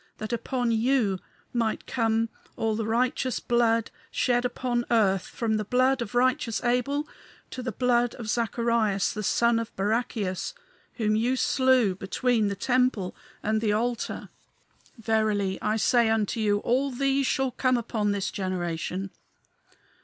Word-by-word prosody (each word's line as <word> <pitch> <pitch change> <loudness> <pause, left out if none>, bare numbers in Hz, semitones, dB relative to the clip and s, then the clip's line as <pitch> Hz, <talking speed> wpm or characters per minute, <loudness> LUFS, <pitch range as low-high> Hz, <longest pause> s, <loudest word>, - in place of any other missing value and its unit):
That 215 +2 -5
upon 245 0 -1
you 225 -4 +2 0.3
might 230 -2 -1
come 225 -1 0 0.3
all 220 -1 0
the 220 0 -2
righteous 250 +2 0
blood 230 -1 +1 0.2
shed 245 0 +1
upon 245 -1 -1
earth, 195 -5 +2
from 220 -2 -1
the 215 - -1
blood 255 +4 +2
of 235 +1 -5
righteous 250 -1 +2
Abel 250 +5 0 0.4
to 255 - -5
the 245 0 -3
blood 245 +1 +1
of 235 - -7
Zacharias, 230 -3 +1
the 215 - -4
son 235 +3 +2
of 230 0 -5
Barachias, 205 - -1 0.4
whom 215 -2 0
ye 240 +4 +1
slew 260 -6 +3
between 215 +4 0
the 200 - -2
temple 245 -3 +1 0.3
and 215 +1 +1
the 210 -2 +1
altar. 235 +2 -2 0.7
Verily 215 -4 0
I 215 - +1
say 235 +1 +3
unto 220 0 0
you 205 -2 +2
all 260 +5 +1
these 275 +1 +1
shall 265 -1 +1
come 255 0 +1
upon 220 -3 -1
this 195 -2 -2
generation! 185 0 -3
230 Hz, 145 wpm, -27 LUFS, 210-250 Hz, 0.7 s, slew